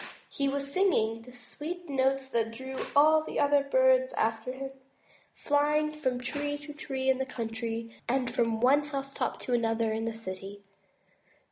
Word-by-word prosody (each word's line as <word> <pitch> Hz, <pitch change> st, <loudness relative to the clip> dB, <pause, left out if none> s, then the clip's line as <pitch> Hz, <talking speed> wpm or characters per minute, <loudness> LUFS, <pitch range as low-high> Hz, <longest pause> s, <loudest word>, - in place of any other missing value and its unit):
He 275 Hz, -, 0 dB
was 280 Hz, 0 st, -3 dB
singing 230 Hz, -, +2 dB
the 250 Hz, +2 st, -13 dB
sweet 315 Hz, +8 st, -7 dB
notes 270 Hz, -1 st, +1 dB
that 230 Hz, -3 st, 0 dB
drew 260 Hz, +3 st, -6 dB
all 310 Hz, +2 st, +6 dB
the -, -, -4 dB
other 285 Hz, -1 st, +4 dB
birds -, -, +4 dB
after 225 Hz, +2 st, 0 dB
him, 270 Hz, +1 st, -6 dB, 0.6 s
flying 300 Hz, +1 st, +2 dB
from 260 Hz, -5 st, -1 dB
tree 290 Hz, +3 st, -2 dB
to 295 Hz, 0 st, -9 dB
tree 270 Hz, -3 st, -4 dB
in 265 Hz, 0 st, +3 dB
the -, -, +1 dB
country, 230 Hz, -1 st, -4 dB
and 255 Hz, 0 st, 0 dB
from 230 Hz, -1 st, +1 dB
one 280 Hz, +4 st, +5 dB
house 275 Hz, -1 st, -4 dB
top -, -, -2 dB
to 250 Hz, -, -3 dB
another 225 Hz, -1 st, +1 dB
in 220 Hz, +1 st, -2 dB
the 230 Hz, -, -2 dB
city. 195 Hz, -1 st, -7 dB
265 Hz, 165 wpm, -29 LUFS, 230-290 Hz, 0.6 s, all